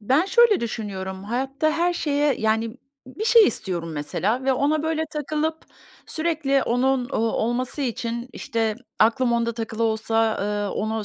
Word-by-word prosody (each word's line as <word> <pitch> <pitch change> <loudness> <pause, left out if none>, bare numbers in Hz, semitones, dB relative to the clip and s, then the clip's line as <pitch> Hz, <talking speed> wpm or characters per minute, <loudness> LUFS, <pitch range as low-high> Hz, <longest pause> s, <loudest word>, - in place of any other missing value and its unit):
Ben 265 - +2
şöyle 450 0 +4
düşünüyorum. 195 -4 -5
Hayatta 270 +7 -1
her 340 +3 +1
şeye, 290 -3 +1
yani 220 +2 0 0.3
Bir 325 +12 -6
şey 460 -1 +7
istiyorum 175 -7 -3
mesela 195 - -1
ve 270 - +3
ona, 290 +4 +1
böyle, 320 0 0
takılıp 305 +1 -2 0.5
sürekli 310 -4 0
onun, 250 +1 +1
ooo, - - -2
olması 240 +5 -1
için, 235 -1 -3
işte, 225 -2 -1 0.2
aklım 240 +3 +3
onda 235 0 +1
takılı 225 0 -4
olsa, 225 0 +1
ııı, 205 0 -1
onu 220 0 -2
240 Hz, 145 wpm, -23 LUFS, 220-295 Hz, 0.5 s, şey